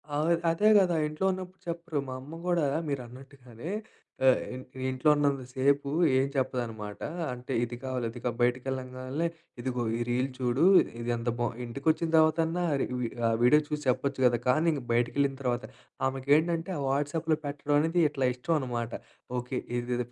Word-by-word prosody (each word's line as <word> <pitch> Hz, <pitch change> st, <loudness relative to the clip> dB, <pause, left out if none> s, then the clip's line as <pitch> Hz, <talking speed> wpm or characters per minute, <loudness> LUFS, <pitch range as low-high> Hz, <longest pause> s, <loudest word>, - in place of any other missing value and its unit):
అవును 155 Hz, +3 st, +2 dB, 0.2 s
అదే 210 Hz, +6 st, +3 dB
కదా! 180 Hz, -3 st, +2 dB
ఇంట్లో 155 Hz, +5 st, -3 dB
ఉన్నప్పుడు 185 Hz, 0 st, -7 dB
చెప్పరు. 170 Hz, -3 st, -3 dB
మా -, -, -4 dB
అమ్మ 160 Hz, +5 st, -9 dB
కూడా 170 Hz, -4 st, +2 dB, 0.2 s
మీరన్నట్టుగానే 130 Hz, +1 st, -7 dB, 0.6 s
ఆహ్, 130 Hz, -, +5 dB, 0.5 s
ఇంట్లో 130 Hz, +4 st, +2 dB
ఉన్నంత 140 Hz, -2 st, +1 dB
సేపు 140 Hz, +2 st, +2 dB, 0.3 s
ఏం 135 Hz, -, +3 dB
చెప్పదనమాట. 115 Hz, -6 st, -2 dB, 0.3 s
అంటే 125 Hz, +2 st, -6 dB
ఇది 120 Hz, 0 st, -2 dB
కావాలి, 130 Hz, -2 st, -2 dB
ఇది 120 Hz, -, -9 dB
కావాలి, 120 Hz, -2 st, -2 dB
బయటికి 125 Hz, +1 st, +2 dB
వెళ్ళంగానే, 130 Hz, +4 st, -3 dB, 0.3 s
ఇదిగో 125 Hz, -1 st, -2 dB
ఈ -, -, -4 dB
రీల్ 125 Hz, +2 st, +1 dB
చూడు, 130 Hz, +4 st, +1 dB, 0.3 s
ఇది 120 Hz, +1 st, -4 dB
ఎంత 115 Hz, +1 st, -2 dB
బావుందో! 120 Hz, -1 st, -1 dB
ఇంటికి 140 Hz, +6 st, -7 dB
వచ్చిన 160 Hz, +1 st, -2 dB
తర్వాతన్నా 160 Hz, +2 st, +3 dB, 0.6 s
ఆహ్, 115 Hz, -, +2 dB
వీడియో 150 Hz, +5 st, +7 dB
చూసి 150 Hz, 0 st, -3 dB
చెప్పొచ్చు 135 Hz, +2 st, 0 dB
కదా! 120 Hz, -1 st, +4 dB
కానీ 155 Hz, +6 st, +3 dB
ఇంక 145 Hz, -3 st, -2 dB
బయటికి 120 Hz, +1 st, +2 dB
వెళ్ళిన 140 Hz, -1 st, +2 dB
తర్వాత, 125 Hz, -2 st, -1 dB, 0.4 s
ఆమెకి 135 Hz, 0 st, -5 dB
ఏంటంటే, 165 Hz, +2 st, -1 dB
ఆ -, -, -3 dB
వాట్సాప్లో 150 Hz, +3 st, 0 dB
పెట్టడం 145 Hz, 0 st, -2 dB
అనేది 165 Hz, +3 st, +2 dB
ఇట్లా 135 Hz, -3 st, 0 dB
ఇష్టమనమాట. 125 Hz, -4 st, -2 dB, 0.5 s
ఓకె 125 Hz, +1 st, -3 dB, 0.2 s
ఇది 120 Hz, 0 st, -1 dB
135 Hz, 160 wpm, -29 LUFS, 125-155 Hz, 0.6 s, వీడియో